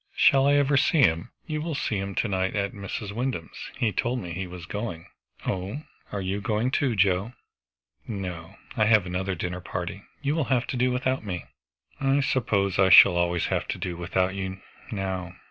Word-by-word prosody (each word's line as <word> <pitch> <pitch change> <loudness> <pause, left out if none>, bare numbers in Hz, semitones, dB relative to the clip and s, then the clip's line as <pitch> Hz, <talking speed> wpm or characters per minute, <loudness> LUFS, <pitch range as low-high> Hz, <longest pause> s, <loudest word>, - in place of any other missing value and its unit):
"Shall 135 0 +5
I 145 - +5
ever 145 0 +3
see 155 +2 +3
him?" 85 -1 +3 0.2
"You 155 -2 -3
will 160 -1 -3
see 110 -6 -1
him 100 0 -4
to - - +1
night 95 -1 -1
at 100 -1 -1
Mrs. 100 +1 -5
Wyndham's; 115 - -4
he 115 -3 +1
told 125 +3 -1
me 90 -6 -6
he 95 +1 -4
was 90 -2 -9
going." 100 -4 -5 0.4
"Oh 100 +11 -3 0.3
are 100 - -3
you 95 +2 -2
going 110 +4 0
too, 135 -4 +1
Joe?" 100 +3 +2 0.7
"No. 90 -6 -5 0.2
I 110 - +3
have 110 -3 +5
another 95 +1 -2
dinner 90 +2 -4
party. 90 +2 -5 0.2
You 140 +1 +1
will 160 -3 0
have 125 -2 +1
to - - -3
do 125 +1 +2
without 130 0 0
me." 90 -4 -4 0.5
"I 135 +1 +2
suppose 100 -8 +1
I 95 -1 +6
shall 90 0 +9
always 85 -1 +1
have - - -1
to - - -3
do 90 -2 -4
without 90 +2 0
you, 95 -1 -4 0.3
now." 95 -3 -3
100 Hz, 195 wpm, -26 LUFS, 90-125 Hz, 0.7 s, shall